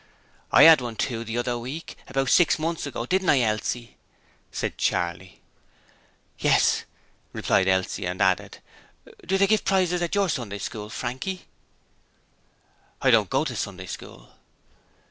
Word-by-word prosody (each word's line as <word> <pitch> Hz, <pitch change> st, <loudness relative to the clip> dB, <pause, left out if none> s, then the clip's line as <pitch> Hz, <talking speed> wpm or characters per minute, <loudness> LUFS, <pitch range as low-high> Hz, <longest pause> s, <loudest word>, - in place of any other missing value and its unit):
'I -, -, +8 dB
'ad 160 Hz, -4 st, +8 dB
one 120 Hz, -2 st, -5 dB
too, 115 Hz, 0 st, -2 dB
the 115 Hz, +1 st, -4 dB
other 120 Hz, 0 st, -1 dB
week, 135 Hz, +8 st, -7 dB
about 135 Hz, -1 st, -1 dB
six 175 Hz, -, +5 dB
months 160 Hz, -1 st, -3 dB
ago, 120 Hz, -4 st, -4 dB
didn't 190 Hz, +6 st, 0 dB
I, 135 Hz, -, +5 dB
Elsie?' 115 Hz, +1 st, -2 dB, 0.5 s
said -, -, -3 dB
Charley. 90 Hz, +1 st, -2 dB, 1.0 s
'Yes,' -, -, +3 dB, 0.5 s
replied 95 Hz, -, +1 dB
Elsie 95 Hz, -1 st, 0 dB
and 90 Hz, +1 st, -4 dB
added: 95 Hz, +1 st, +1 dB, 0.7 s
'Do 190 Hz, +2 st, 0 dB
they 195 Hz, -, +4 dB
give 215 Hz, +2 st, +2 dB
prizes 185 Hz, -2 st, +1 dB
at 175 Hz, +2 st, -1 dB
your 200 Hz, -1 st, +2 dB
Sunday 120 Hz, -, -3 dB
School, 105 Hz, +1 st, -6 dB
Frankie?' 130 Hz, -, -5 dB, 1.6 s
'I 130 Hz, -, +5 dB
don't 110 Hz, -4 st, +4 dB
go 135 Hz, +4 st, +1 dB
to 130 Hz, -5 st, -4 dB
Sunday 95 Hz, -4 st, -5 dB
School.' -, -, -10 dB
120 Hz, 145 wpm, -25 LUFS, 105-165 Hz, 1.6 s, I